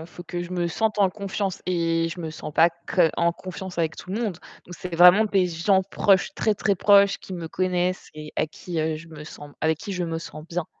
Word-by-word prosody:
il - - -10
faut 175 +1 -11
que 175 0 -4
je 175 - -8
me 175 -1 -1
sente 215 +5 -1
en 200 -2 +5
confiance 200 -1 -4
et 165 -2 +1
je 175 - -7
me 160 - -4
sens 155 - -8
pas 165 +3 +6
que 170 0 +1
en 170 0 +2
confiance 185 +1 -8
avec 160 -1 0
tout 185 - -10
le 215 +4 -2
monde. 215 -6 -1 0.3
Donc 180 - -9
c'est 180 -2 -6
vraiment 180 +5 +8
des 195 -3 +2
gens 180 +3 +2
proches, 195 0 +2
très, 215 -1 +1
très 200 0 +1
proches, 200 +1 +5
qui 190 - -11
me 170 -2 -5
connaissent 180 0 -1
et 155 0 -9
à - - +1
qui, 170 +2 -6
heu, 155 0 -1
je 165 +2 -12
me 155 -2 -10
sens 145 -1 -11
avec 160 0 +2
qui 200 - -6
je 180 -1 -2
me 165 -1 -3
sens 155 -2 -9
bien. 170 0 -3
175 Hz, 250 wpm, -24 LUFS, 165-190 Hz, 0.3 s, vraiment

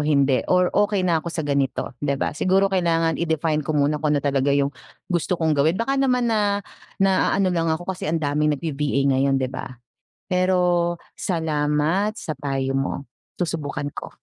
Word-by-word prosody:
hindi? 140 -3 +2
Or 180 -1 +3
okey 205 -2 +2
na 165 -2 +2
ako 170 - -5
sa 160 -2 -3
ganito," 140 -2 -1
'di 140 -1 0
ba? - - -1
Siguro 190 +4 +3
kailangan 165 -4 +1
i-define 160 -2 0
ko 150 - -4
muna 145 +1 +1
kung 150 - +2
ano 145 - -2
talaga 140 0 +1
yung 140 0 +2 0.3
gusto 175 0 -1
kong 160 -2 +2
gawin. 155 +6 +2
Baka 270 +4 0
naman 250 -3 +2
na 205 -1 +1 0.3
naano 195 0 +2
lang 165 -1 +1
ako 160 +2 -2
kasi 160 - -5
ang 165 - +1
daming 150 0 0
nagbi-VA 140 -3 -1
ngayon, 135 0 +2
'di 130 - 0
ba. - - -6 0.6
Pero 180 -2 +2 0.2
salamat 160 +3 0
sa 155 - -4
payo 135 -1 -2
mo, 135 +1 -2 0.3
susubukan 150 -4 -2
ko. - - -8
160 Hz, 170 wpm, -23 LUFS, 145-180 Hz, 0.6 s, Or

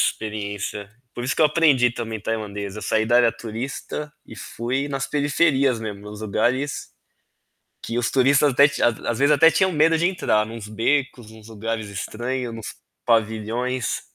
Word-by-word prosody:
experiência. 105 -1 -3 0.3
Por 120 - -5
isso 125 - -2
que - - +3
eu 155 - +7
aprendi 145 -6 +3
também 115 -2 -5
tailandês. 105 -2 -4
Eu 105 - -6
saí 110 - +1
da 120 - +4
área 120 -1 +5
turista 130 +6 -6 0.2
e - - -11
fui 125 +6 -3
nas 135 -1 -2
periferias 140 -3 +2
mesmo, 105 -3 -6
nos 105 +1 -9
lugares 125 +7 -1 0.9
que 115 - -4
os 120 - 0
turistas 140 +2 +4
até 140 +3 +7
te 140 - -5
às 115 0 0
vezes, 140 +2 +4
até 155 +3 +7
tinham 190 +4 +2
medo 165 0 +3
de 170 - +1
entrar, 110 - +1
em - - -9
uns 115 -3 -8
becos, 120 +1 -1
em 110 - -14
uns 110 - -15
lugares 110 0 -4
estranho, 120 +5 -4
em - - -7
uns 110 - -7 0.3
pavilhões. 115 +2 0
120 Hz, 180 wpm, -23 LUFS, 110-140 Hz, 0.9 s, eu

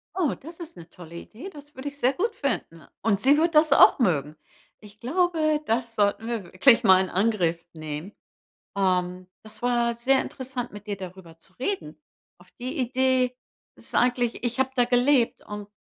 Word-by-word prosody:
Oh, 350 -7 0
das 330 +5 -13
ist 325 - -10
'ne 170 -1 -11
tolle 170 -1 -13
Idee, 230 - -9
das 295 -2 -14
würde 260 +2 -7
ich 285 - -18
sehr 260 0 +2
gut 440 +9 -2
finden. 165 - -3 0.2
Und 205 -2 +1
sie 275 +6 +4
wird 330 +1 +1
das 305 -1 +5
auch - - +7
mögen. 155 - 0 0.4
Ich 210 0 -16
glaube, 310 +1 +1
das 230 -1 -1
sollten 205 +1 +1
wir 230 -3 -3
wirklich 230 +7 +4
mal 190 -3 +6
in 185 - -6
Angriff 185 -4 +1
nehmen. 155 +4 -7 0.6
Ähm, 180 -1 0 0.2
das 215 +1 -12
war 240 -1 +1
sehr 265 +3 +3
interessant, 255 -2 -6
mit 205 0 -11
dir 205 - -2
darüber 185 -3 -11
zu 185 +3 -22
reden. 380 - -4 0.4
Auf - - -19
die 255 +6 -5
Idee 255 0 +1 0.4
ist - - -15
eigentlich 245 -1 +1
ich 240 +1 -2
habe 265 - +2
da 245 -2 +3
gelebt 245 0 +2
und 210 -1 -8
235 Hz, 180 wpm, -25 LUFS, 190-265 Hz, 0.6 s, auch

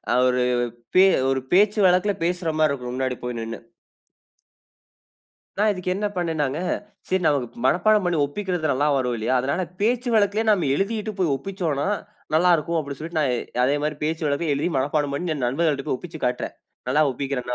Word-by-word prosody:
அ - - +3
ஒரு 125 0 +2 0.5
பே 185 - +7 0.3
ஒரு 135 0 +1
பேச்சு 205 +3 +4
வழக்குல 185 +3 +3
பேசுற 175 0 -1
மாரி 155 -1 +4
இருக்கும். 125 -3 -5
முன்னாடி 130 -1 -1
போய் 125 -1 -4
நின்னு. 115 0 -5 2.0
நான் 215 +1 +4
இதுக்கு 180 -1 -3
என்ன 210 +2 -1
பண்ணினேன்னாங்க? 160 -5 -1 0.5
சரி 185 0 +1
நமக்கு 125 -5 0
மனப்பாடம் 210 +7 +3
பண்ணி 175 -1 +1
ஒப்பிக்குறது 175 0 -2
நல்ல 145 +3 +1
வரும் 125 -2 0
இல்லையா? 115 +3 0
அதனால 140 +8 -1 0.2
பேச்சு 240 +3 +1
வழக்குலேயே 210 +1 +2
நம்ம 180 -9 +2
எழுதிட்டு 215 +4 -1
போய் 170 -6 +2
ஒப்பிச்சோம்னா 165 -3 -2 0.5
நல்ல 175 +3 +5
இருக்கும். 165 +2 -2
அப்டீன்னு 140 -3 -5
சொல்லிட்டு 160 0 -2
நான் 140 -4 +1 0.3
அதே 140 +3 +2
மாரி 150 0 -2
பேச்சு 160 +1 -2
வழக்குல 145 +2 0
எழுதி 145 - 0
மனப்பாடம் 145 +1 0
பண்ணிட்டு 160 +2 -2
என் 130 - -2
நண்பர்கள்ட்ட 140 +1 0
போய் - - +1
ஒப்பிச்சிக் 160 -5 -7
காட்டுறேன். 125 0 -2 0.3
நல்ல 150 +3 +3
ஒப்பிக்குறான? 125 -2 -3
155 Hz, 170 wpm, -23 LUFS, 135-185 Hz, 2.0 s, பே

